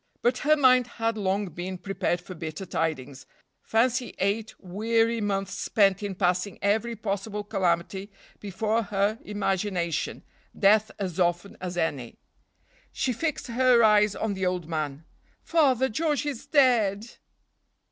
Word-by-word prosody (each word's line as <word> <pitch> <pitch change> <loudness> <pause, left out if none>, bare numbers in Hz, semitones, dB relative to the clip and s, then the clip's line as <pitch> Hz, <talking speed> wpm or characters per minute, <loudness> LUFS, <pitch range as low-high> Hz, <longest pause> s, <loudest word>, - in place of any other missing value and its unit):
But 245 +1 +2
her 305 +2 +4
mind 255 -3 +5
had 230 -1 -2
long 200 -1 -1
been 180 +3 -6
prepared 180 -2 -2
for 185 - -9
bitter 160 +2 -6
tidings. 145 -6 -3 0.3
Fancy 245 +2 0
eight 210 +3 -1
weary 225 +4 0
months 195 -1 -1
spent 195 -2 +2
in 200 -2 -4
passing 180 +1 0
every 220 +4 0
possible 210 0 -3
calamity 190 -1 -1 0.3
before 215 +3 -1
her 205 +1 0
imagination, 190 -5 -2 0.3
death 215 +2 +4
as 185 -3 -4
often 175 +2 0
as 180 -1 -5
any. 140 -8 -2 0.7
She 255 - -1
fixed 305 +6 -2
her 245 0 +4
eyes 210 -1 +4
on 220 -2 -2
the 190 -1 -4
old 180 -3 -2
man. 155 -2 -4 0.4
"Father, 265 -6 +3
George 295 +4 -1
is 280 -5 -5
dead!" 225 -8 +3
205 Hz, 135 wpm, -26 LUFS, 180-230 Hz, 0.7 s, mind